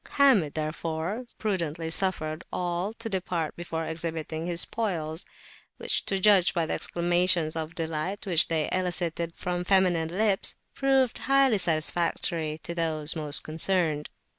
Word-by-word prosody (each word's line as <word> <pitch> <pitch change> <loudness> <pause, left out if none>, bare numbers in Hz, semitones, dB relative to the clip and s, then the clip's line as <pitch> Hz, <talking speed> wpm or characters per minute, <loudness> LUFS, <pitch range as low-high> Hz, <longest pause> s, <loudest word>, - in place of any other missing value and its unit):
Hamid 245 - +4
therefore 160 +7 -3
prudently 165 -6 -2
suffered 165 -3 0
all 175 +3 -2
to 230 0 -5
depart 180 -5 -3
before 165 -1 -4
exhibiting 160 0 -4
his 175 -1 +2
spoils; 165 -7 -2 0.5
which, - - -2
to 195 - 0
judge 190 -2 +4
by 170 -2 +1
the - - -2
exclamations 175 -2 +2
of 160 +1 -4
delight 165 +4 -3
which 175 -4 +5
they 160 -2 +1
elicited 175 -2 -1
from 180 0 -3
feminine 180 -4 +2
lips, 195 +2 +2 0.2
proved 270 -3 +1
highly 270 -5 +3
satisfactory 165 -1 0
to 170 - -4
those 160 -2 0
most 150 -2 +1
concerned. 160 -2 0
170 Hz, 135 wpm, -27 LUFS, 160-190 Hz, 0.5 s, which